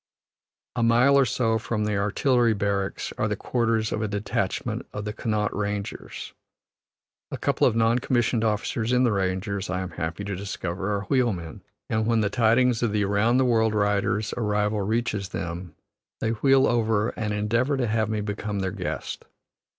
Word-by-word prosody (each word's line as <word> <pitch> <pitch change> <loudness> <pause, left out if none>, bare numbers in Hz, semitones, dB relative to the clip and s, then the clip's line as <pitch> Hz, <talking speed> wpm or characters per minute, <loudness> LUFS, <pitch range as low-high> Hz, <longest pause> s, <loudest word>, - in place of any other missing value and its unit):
A 120 - 0
mile 120 +4 +5
or 140 -1 +5
so 115 -1 +1
from 110 -1 -2
the 105 0 0
Artillery 115 +3 +2
barracks 100 -1 -2
are - - +2
the - - -1
quarters 115 -3 0
of 105 - -1
a 110 - 0
detachment 105 0 -2
of 105 0 -4
the 105 - -3
Connaught 105 -2 -1
Rangers. 105 -1 -4 1.0
A - - -4
couple - - +2
of - - +1
non 115 +1 +3
commissioned 120 -2 +1
officers 110 +1 0
in 125 0 +4
the 120 - +3
Rangers, 100 +1 -1
I 95 0 -1
am 95 -1 -5
happy 85 +4 -4
to 100 -1 -3
discover, 95 0 -4
are 100 0 -1
wheelmen, 100 - -1 0.3
and 110 0 0
when 115 -1 +3
the 100 -1 0
tidings 120 0 +3
of 115 -3 0
the 105 -1 +2
Around 100 +5 +2
the 130 - +3
World 110 -3 +2
rider's 105 +1 +1
arrival 105 -2 0
reaches 105 -2 -1
them, 85 +1 -5 0.4
they 110 - 0
wheel 135 +4 +4
over 110 -2 +2
and 110 -1 -3
endeavor 115 +7 +1
to 130 - +1
have 110 -1 0
me 110 -1 -1
become 105 0 -3
their 95 -1 -1
guest. - - -5
110 Hz, 175 wpm, -25 LUFS, 100-115 Hz, 1.0 s, mile